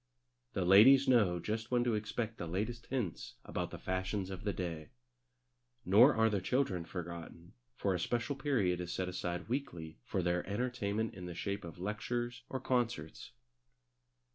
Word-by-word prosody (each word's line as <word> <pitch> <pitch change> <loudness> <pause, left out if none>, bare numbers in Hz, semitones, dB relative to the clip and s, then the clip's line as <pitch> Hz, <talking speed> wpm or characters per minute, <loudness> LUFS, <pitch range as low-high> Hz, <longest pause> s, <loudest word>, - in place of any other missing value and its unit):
The 95 - 0
ladies 120 +9 +8
know 105 -9 +4
just 110 +5 -3
when 125 -1 +2
to 120 -2 +1
expect 110 +1 -3
the 85 - -4
latest 110 +7 -3
hints 120 - -3
about - - -3
the - - -7
fashions 95 +1 -2
of 95 -1 -7
the 100 - +1
day. 85 -5 -4 1.0
Nor 115 +9 +7
are 110 0 +4
the 105 -3 0
children 95 -6 0
forgotten, 85 -1 -7 0.2
for 100 - 0
a 90 - -1
special 120 +9 -1
period 115 -11 +1
is 90 -1 -4
set 95 0 -2
aside 90 -1 -3
weekly 85 - -4
for 95 - -2
their 90 0 +1
entertainment 110 -1 -1
in 90 -2 -7
the 90 - -6
shape 100 +3 -3
of 85 -1 -8
lectures 120 +5 -3
or 130 - -3
concerts. 120 -12 -1
100 Hz, 165 wpm, -34 LUFS, 90-120 Hz, 1.0 s, ladies